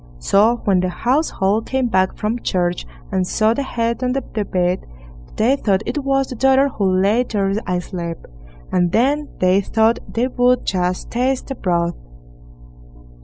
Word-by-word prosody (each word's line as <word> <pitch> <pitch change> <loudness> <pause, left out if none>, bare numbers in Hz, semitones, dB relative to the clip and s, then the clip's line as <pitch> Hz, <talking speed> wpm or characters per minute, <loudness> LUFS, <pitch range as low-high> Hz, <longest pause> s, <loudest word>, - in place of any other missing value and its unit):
So 215 - +2
when 195 -3 +3
the 185 0 0
household 225 - 0
came 265 -1 0
back 190 -5 +1
from 220 +3 -2
church, 175 -1 -1 0.2
and 185 -2 0
saw 215 +3 +2
the 280 - -2
head 235 -3 -2
on 250 0 0
the 270 - -1
bed, 185 -4 -2 0.5
they 240 +5 +3
thought 200 -6 0
it 290 - -3
was 270 0 +1
the 255 - -6
daughter 270 +3 +3
who 200 -7 0
lay 205 +5 +3
there 200 -5 -1
asleep; 175 -1 -3 0.5
and 175 -1 +2
then 285 +5 +1
they 185 +2 +3
thought 225 +3 +2
they 240 +2 0
would 250 0 +2
just 180 -1 -1
taste 255 +3 -1
the - - -2
broth. 170 -6 -1
220 Hz, 160 wpm, -19 LUFS, 185-250 Hz, 0.5 s, when